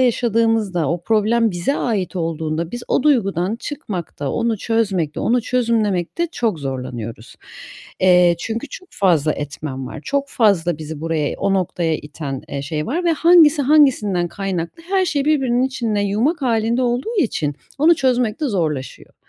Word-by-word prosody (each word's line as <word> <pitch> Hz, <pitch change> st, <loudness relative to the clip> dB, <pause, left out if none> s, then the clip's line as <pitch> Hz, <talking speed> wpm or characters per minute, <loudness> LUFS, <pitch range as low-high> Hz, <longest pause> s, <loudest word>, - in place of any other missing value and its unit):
yaşadığımızda, 225 Hz, -, +1 dB
o 170 Hz, 0 st, -2 dB
problem 225 Hz, +3 st, +2 dB
bize 175 Hz, +10 st, -1 dB
ait 200 Hz, -6 st, -2 dB
olduğunda 165 Hz, 0 st, -2 dB
biz 240 Hz, 0 st, -6 dB
o -, -, +2 dB
duygudan 210 Hz, -, +1 dB
çıkmakta, 180 Hz, -, -5 dB
onu 230 Hz, -2 st, -1 dB
çözmekte, 195 Hz, -9 st, -1 dB
onu 240 Hz, +1 st, +1 dB
çözümlemekte 230 Hz, -, 0 dB
çok 215 Hz, -10 st, -1 dB
zorlanıyoruz. 125 Hz, -4 st, -6 dB, 0.7 s
Eee, 180 Hz, -2 st, +5 dB
çünkü 225 Hz, +9 st, -4 dB
çok 370 Hz, -, -10 dB
fazla 165 Hz, -6 st, +2 dB
etmen 140 Hz, -2 st, -5 dB
var, 155 Hz, -, -8 dB
çok 280 Hz, 0 st, -1 dB
fazla 175 Hz, -, +2 dB
bizi 155 Hz, -1 st, -7 dB
buraya, 160 Hz, -2 st, -1 dB
o 195 Hz, -, +1 dB
noktaya 170 Hz, -3 st, 0 dB
iten, 145 Hz, -3 st, -6 dB
eee, 140 Hz, -, -4 dB
şey 150 Hz, +1 st, -3 dB
var 340 Hz, +8 st, -2 dB
ve 335 Hz, -, +3 dB
hangisi 320 Hz, -3 st, +5 dB
hangisinden 250 Hz, -, +3 dB
kaynaklı 190 Hz, -, -4 dB
her 380 Hz, -1 st, +2 dB
şey 290 Hz, -5 st, 0 dB
birbirinin 265 Hz, -5 st, +2 dB
içinde 235 Hz, -5 st, -1 dB
yumak 230 Hz, -, 0 dB
hâlinde 230 Hz, 0 st, +1 dB
olduğu 250 Hz, -, -1 dB
için, 155 Hz, -, 0 dB, 0.2 s
onu 325 Hz, +4 st, +5 dB
çözmek 250 Hz, -5 st, +1 dB
de 295 Hz, -, 0 dB
zorlaşıyor. 155 Hz, -, -3 dB
205 Hz, 150 wpm, -20 LUFS, 165-250 Hz, 0.7 s, Eee